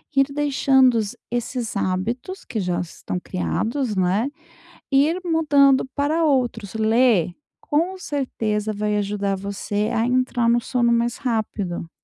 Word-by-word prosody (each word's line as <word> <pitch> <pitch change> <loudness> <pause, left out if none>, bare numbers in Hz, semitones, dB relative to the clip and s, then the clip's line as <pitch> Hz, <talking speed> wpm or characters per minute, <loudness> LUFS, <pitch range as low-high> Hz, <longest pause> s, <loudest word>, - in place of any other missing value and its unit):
ir 275 0 +5
deixando 270 -3 +3
os 215 -3 -1 0.2
esses 240 -1 -3
hábitos, 225 - -2
que 225 - -4
já 180 -3 -1
estão 180 +1 -5
criados, 220 +7 -2
né, 190 +7 +1 0.6
ir 295 +6 +3
mudando 290 -5 +4
para 310 +3 +1
outros. 240 -8 0
Ler, 220 -5 +3 0.3
com 345 +6 -1
certeza, 220 - -2
vai 210 0 -1
ajudar 200 -1 -1
você 200 +2 -2
a 230 0 +1
entrar 250 -1 +1
no 240 +1 +4
sono 240 0 +1
mais 235 0 +1
rápido. 210 -8 -3
235 Hz, 130 wpm, -22 LUFS, 205-275 Hz, 0.6 s, ir